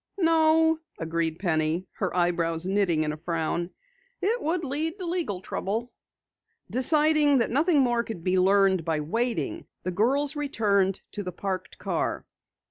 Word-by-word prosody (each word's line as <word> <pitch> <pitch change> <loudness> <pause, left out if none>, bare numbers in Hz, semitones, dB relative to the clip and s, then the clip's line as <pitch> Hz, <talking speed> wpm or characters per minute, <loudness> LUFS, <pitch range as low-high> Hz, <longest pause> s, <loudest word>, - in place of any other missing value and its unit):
"No," 320 -2 +3 0.2
agreed 165 0 -2
Penny, 160 -1 0
her 185 -2 -3
eyebrows 170 -1 +1
knitting 190 -5 +1
in 150 - -1
a - - -7
frown, 170 +1 -2 0.5
"it 460 +5 0
would 335 +2 -1
lead 310 +5 -2
to 370 - -5
legal 335 - -2
trouble." 220 +6 -3 0.8
Deciding 295 +2 +4
that 230 - +1
nothing 295 +3 +3
more 240 -2 +1
could 220 -8 -7
be 185 +1 +2
learned 190 -1 +3
by 155 -1 -1
waiting, 240 - -2 0.2
the 185 - -2
girls 270 - +2
returned 205 -10 0
to 205 - -3
the 180 -2 -5
parked 185 +1 -5
car. - - -2
205 Hz, 145 wpm, -26 LUFS, -, 0.8 s, Deciding